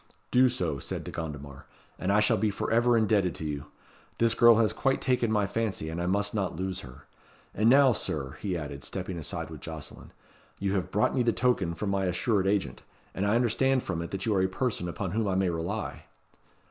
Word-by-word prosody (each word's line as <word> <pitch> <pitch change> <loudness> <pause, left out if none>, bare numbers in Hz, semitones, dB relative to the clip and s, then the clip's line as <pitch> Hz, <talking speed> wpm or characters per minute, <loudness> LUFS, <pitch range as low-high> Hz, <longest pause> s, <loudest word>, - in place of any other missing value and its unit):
"Do 125 +1 +5
so," 85 - -2
said - - -4
De - - -7
Gondomar, 70 -3 -7 0.3
"and 95 - 0
I 105 +1 +4
shall 105 - +3
be 110 +2 +1
for 100 - -3
ever 120 +1 +4
indebted 105 -5 +2
to 80 - -6
you. 75 -1 -4 0.5
This 115 -1 +3
girl 120 -1 +7
has 110 -1 +2
quite 135 0 +1
taken 125 -3 +1
my 105 -2 +2
fancy, 100 -6 -2
and 80 +2 -4
I 90 - -1
must 100 +2 0
not 100 -6 -1
lose 95 +2 -3
her. 65 -5 -12 0.5
And 110 +3 +3
now, 135 0 +6
Sir," 70 - -2
he 95 -4 -1
added, 70 -3 -6
stepping 95 -2 -5
aside 80 +1 -4
with 75 -3 -9
Jocelyn, 80 -3 -8 0.5
"you 95 0 -1
have 95 -3 -1
brought 105 - +1
me 130 - +1
the 120 -1 +3
token 105 -9 +1
from 100 +3 -2
my 95 -1 0
assured 95 +2 +1
agent, 95 -11 0 0.3
and 100 +2 -1
I 105 - +3
understand 125 +2 +2
from 85 -3 -3
it 85 - -5
that 95 -1 -4
you 110 - +1
are 95 - +2
a 95 - +3
person 95 -3 -2
upon 90 +1 -4
whom 110 +2 0
I 95 - 0
may 95 -2 +2
rely." 85 +6 -4
95 Hz, 220 wpm, -28 LUFS, 85-110 Hz, 0.5 s, girl